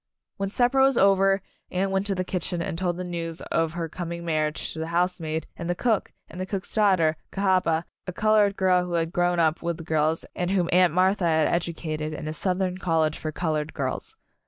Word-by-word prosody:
When 195 0 -2
supper 245 +5 +2
was 270 -2 +4
over, 195 0 +4 0.3
Anne 190 +2 -1
went 195 +1 0
to 195 - 0
the 185 - -1
kitchen 180 -1 -3
and 175 +1 -3
told 175 0 -1
the 180 - -3
news 170 -2 -4
of 165 -1 -1
her 170 -1 -3
com 170 +1 -6
ing 170 0 -5
marriage 155 -2 -1
to 160 - -7
the 160 - -3
housemaid 170 -2 -1
and 170 - -5
the 175 - +1
cook, 225 +1 0 0.2
and 180 +3 -8
the 185 - -3
cook's 195 -1 -4
daughter, 185 -7 +3
Cahaba, 185 -4 +1 0.2
a - - -2
colored 210 +1 +3
girl 185 -1 +3
who 180 -1 -5
had 165 0 0
grown 175 0 +2
up 160 0 +2
with 170 -1 -2
the 165 - -8
girls 155 0 0
and 175 0 -1
whom 185 -3 +1
Aunt 180 -1 +5
Martha 185 +2 +2
had 160 -2 +3
ed 170 - +2
ucated 155 -2 -4
in - - -6
a 155 - -3
Southern 185 +2 -1
college 160 -4 +1
for 155 - -3
colored 155 -2 -2
girls. 445 - -3
175 Hz, 220 wpm, -25 LUFS, 165-190 Hz, 0.3 s, Aunt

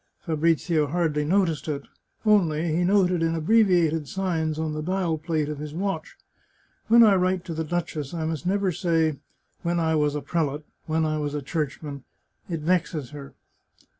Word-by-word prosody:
Fabrizio 160 -1 +1
hardly 155 -1 0
noticed 165 -1 +1
it; 145 -2 -3 0.4
only 170 -6 +3
he 175 - +2
noted 180 -2 +3
in 165 0 +1
abbreviated 170 -4 +3
signs 165 -4 -1
on 160 -1 -2
the 155 - -3
dial 175 -1 -1
plate 155 -2 -1
of 150 -1 -5
his 150 0 -6
watch, 195 +2 -3 0.3
" - - -39
When 235 +1 +7
I 210 -3 +6
write 185 -1 +1
to 170 - -5
the 160 0 -2
duchess 155 -3 -3
I 165 -2 -3
must 160 -1 -3
never 195 0 +1
say 160 -3 +1 0.2
' - - -44
when 170 0 0
I 160 -1 +1
was 150 -2 +1
a 150 - -2
prelate, 150 -3 -1 0.2
when 160 0 +1
I 155 0 -1
was 145 -1 -2
a 145 - -2
churchman 145 -2 -4
' - - -48
— - - -36
it 165 -3 -3
vexes 160 -4 0
her." 140 -2 -10
160 Hz, 190 wpm, -25 LUFS, 150-180 Hz, 0.4 s, When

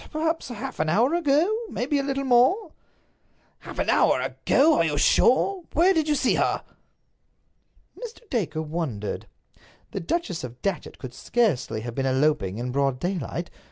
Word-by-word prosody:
Perhaps 320 +1 -1
half 235 -4 -6
an 155 0 +1
hour 230 - +3
ago; 315 -1 +3 0.2
perhaps 255 +5 -3
a 285 - +3
little 275 0 -2
more." 270 - +3 0.9
"Half - - -10
an - - +1
hour - - +3
ago! 310 +4 +2
Are - - +4
you 150 -3 -1
sure? 355 - +3
Where 355 +5 +4
did 315 -3 0
you 300 - +2
see 265 - +2
her?" - - 0 1.3
Mr. 475 -1 -10
Dacre 170 -9 -1
wondered. 150 -10 -4 0.6
The - - -3
Duchess 185 - -2
of 125 0 -8
Datchet 195 -3 -3
could 130 -3 -8
scarcely 140 - 0
have 120 +1 -6
been 135 +2 -1
eloping 130 -7 +1
in 125 +2 -3
broad 135 -1 0
daylight. 175 -1 -3
205 Hz, 160 wpm, -25 LUFS, -, 1.3 s, Are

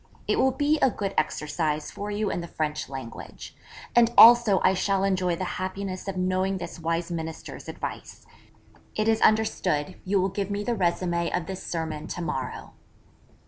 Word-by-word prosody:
It - - +1
will 265 - +5
be 295 +3 +1
a 265 - +4
good 200 -4 -3
exercise 150 0 -1
for 205 +1 -6
you 210 0 -1
in - - -2
the 170 - -7
French 150 -4 -3
language. 130 -4 -8 0.4
And 235 -1 +6
also 235 -4 +8
I 185 - +5
shall 195 0 +1
enjoy 185 -3 +1
the 185 - -4 0.2
happiness 190 0 -4
of 195 -1 -3
knowing 185 +1 0
this 175 -1 -7
wise 165 +1 -2
Minister's 160 -1 -6
advice. - - -7 0.7
It 215 0 0
is 225 0 +2
understood, 190 -7 +1
you 195 +1 +1
will 190 +1 +1
give 195 +1 -3
me 205 0 -2
the 240 - 0
résumé 175 -3 0
of 170 - -8
this 190 +2 -6
sermon 160 -2 -4
to 175 - -5
morrow.' 130 -6 -4
185 Hz, 175 wpm, -26 LUFS, 165-205 Hz, 0.7 s, also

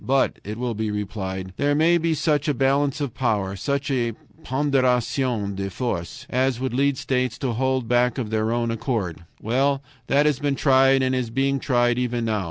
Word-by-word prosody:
But, 135 +1 +1
it 105 +2 -6
will 120 -1 -2
be 110 0 -2
replied, 95 -3 -4
there 145 0 +2
may 170 +3 +4
be 165 -1 +1
such 150 -1 +1
a 145 - +1
balance 140 +2 +1
of 140 -5 -2
power, 105 -6 -1
such 140 +7 -2
a 120 -3 0 0.3
PONDÉRATION 130 -5 0
DE 95 0 -3
FORCES, 120 +3 -4
as 130 -1 0
would 130 -1 -2
lead 140 +1 +2
states 130 -3 -1
to 130 -3 -2
hold 130 0 0
back 120 +1 +2
of 115 -5 -3
their 110 0 0
own 120 0 0
accord. 110 - -3
Well, 135 +5 +1 0.2
that 145 +2 +3
has 150 -4 +2
been 145 -1 0
tried 135 -1 +4
and 130 0 +1
is 125 -3 -1
being 135 +3 0
tried 120 -2 +2
even 120 -1 -1
now. 110 -2 0
125 Hz, 190 wpm, -23 LUFS, 115-135 Hz, 0.3 s, may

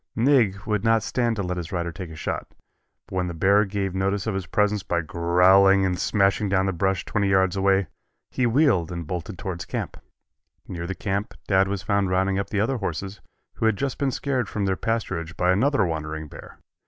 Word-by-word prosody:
"Nig" 115 -5 +3
would 105 -3 -1
not 115 -1 +3
stand 120 -2 0
to 100 - -2
let 90 0 -3
his 85 -2 -5
rider 85 -2 -2
take 90 +1 -8
a 80 - -9
shot, - - -5 0.5
but - - -9
when 90 -1 0
the 85 - -5
bear 100 +5 +4
gave 100 -1 -3
notice 95 +1 -1
of 110 - -1
his 95 -2 -4
presence 105 0 +1
by 85 -1 -1
growling 90 +4 +4
and 90 -1 -1
smashing 100 0 +1
down 95 0 +2
the 95 - 0
brush 95 +2 0
twenty 100 -2 0
yards 95 -1 +3
away, 95 0 +2 0.5
he 125 -2 +1
wheeled 115 - +2
and 85 -1 -5
bolted 90 +3 -5
towards 95 -5 -5
camp. - - -5 0.7
Near 85 -1 -5
the 95 - -4
camp 100 +2 -3
Dad 95 -1 +3
was 100 -1 -3
found 100 0 +1
rounding 95 +1 +1
up 100 - -3
the 105 - -1
other 125 +5 0
horses, 95 0 -5 0.4
who 110 - +1
had 110 -3 +1
just 140 +2 -3
been 140 -1 +1
scared 130 -4 -2
from 105 -2 -2
their 95 -1 +1
pasturage 90 -7 -3
by 90 0 +3
another 115 +3 +2
wandering 80 -1 -4
bear. - - -12
95 Hz, 210 wpm, -24 LUFS, 90-105 Hz, 0.7 s, bear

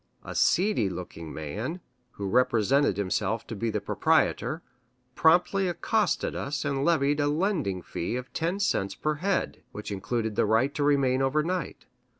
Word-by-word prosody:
A - - -7
seedy 180 - +2
looking 85 -3 -7
man, 105 - -4 0.3
who 100 - -4
represented 125 +1 +3
himself 100 +3 -1
to 115 - -6
be 115 +3 -1
the 105 - -1
proprietor, 155 - +1 0.5
promptly 180 +5 +3
accosted 180 +3 0
us 140 +1 -3
and 140 -1 0
levied 145 -3 +2
a 145 - +2
"landing 150 - 0
fee" 85 - -3
of 125 0 -6
ten 170 +4 -1
cents 100 - 0
per 155 - -1
head, 195 +1 -1
which 105 0 -7
included 110 +2 -2
the - - +2
right 115 +6 +2
to 145 - -1
remain 135 -3 +3
over 140 +3 +2
night. 180 0 -3
135 Hz, 155 wpm, -27 LUFS, 105-160 Hz, 0.5 s, represented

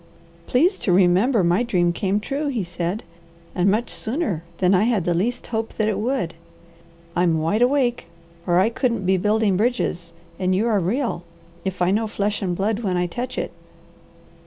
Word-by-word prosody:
"Please 345 +10 +2
to 190 - 0
remember 190 +5 +4
my 175 +5 +3
dream 180 -8 +1
came 195 +3 0
true," 280 +7 -3
he 245 -8 -1
said, 175 +4 -3 0.5
"and 185 +2 +2
much 220 +4 0
sooner 220 - -2
than 185 0 +3
I 195 +3 +4
had 220 -7 +1
the 175 - +2
least 235 +9 -1
hope 225 0 -2
that 215 - 0
it 205 -2 0
would. 230 -7 -1 0.8
I'm 175 -2 +2
wide 165 +8 0
awake 245 -6 +2 0.4
or 175 0 +4
I 195 +4 +4
couldn't 230 -5 -1
be 190 +1 +3
building 210 +1 +2
bridges; 205 -7 -1 0.3
and 185 0 +1
you 205 +4 +1
are 220 -4 +2
real, 200 0 -1 0.4
if 185 -2 -2
I 180 - +3
know 220 +3 +1
flesh 205 -1 -2
and 180 -3 -1
blood 205 +4 0
when 190 -6 -1
I 180 - +1
touch 245 +8 -5
it." - - -2
205 Hz, 180 wpm, -22 LUFS, 180-235 Hz, 0.8 s, remember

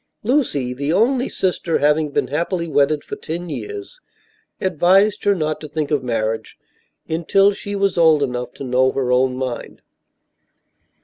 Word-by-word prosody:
Lucy, 210 - 0
the 140 +4 -2
only 245 +8 +2
sister, 180 -3 -1
having 150 +1 +2
been 130 - -1
happily 170 +4 -1
wedded 145 0 +2
for - - -6
ten 170 +2 -6
years, 415 - -7 0.6
advised 190 +4 +3
her 200 0 +4
not 155 -3 -2
to 155 - -7
think 150 0 -3
of 145 -3 +2
marriage 115 -2 -2 0.5
until 195 +5 +3
she 205 0 -5
was 195 -3 +1
old 160 -3 +5
enough 125 -2 -3
to - - -9
know 130 0 +2
her 130 -2 -1
own 130 0 +2
mind. 130 -2 -5
155 Hz, 150 wpm, -20 LUFS, 130-195 Hz, 0.6 s, old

